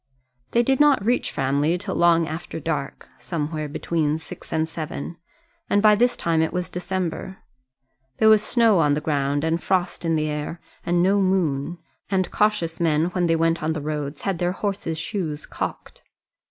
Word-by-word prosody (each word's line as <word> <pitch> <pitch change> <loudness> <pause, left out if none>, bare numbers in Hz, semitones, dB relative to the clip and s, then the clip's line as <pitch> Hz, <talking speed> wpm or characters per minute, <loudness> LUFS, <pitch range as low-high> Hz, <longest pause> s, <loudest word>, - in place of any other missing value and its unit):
They 235 - +3
did 265 +2 +2
not 290 -8 +4
reach 245 +2 +1
Framley 140 +5 +1
till 190 +1 -4
long 170 -1 +4
after 160 +1 -5
dark 150 -3 -4
somewhere 155 -2 -3
between 155 0 -1
six 160 - -11
and 160 0 +1
seven 160 0 -6 0.5
and 205 - +3
by 210 0 +6
this 245 +4 +2
time 165 -1 +1
it 160 - 0
was 180 0 -3
December. 185 0 -3 0.8
There 220 - +4
was 215 -1 +7
snow 225 -3 +3
on 145 -2 +3
the - - 0
ground, 145 -1 0
and 160 +1 0
frost 180 -2 0
in 165 -1 +1
the 155 0 0
air, 150 +3 -4 0.2
and 175 0 +2
no 195 +2 +3
moon, 175 -4 0 0.3
and 185 -2 0
cautious 210 -6 +1
men 165 0 +2
when 180 -1 +1
they 165 - +3
went 165 0 +1
on 155 +1 0
the 160 - -3
roads 150 -1 -4
had 195 -4 -2
their 175 0 0
horses' 195 -5 -3
shoes 160 -3 -3
cocked. - - -6
165 Hz, 180 wpm, -23 LUFS, 155-190 Hz, 0.8 s, was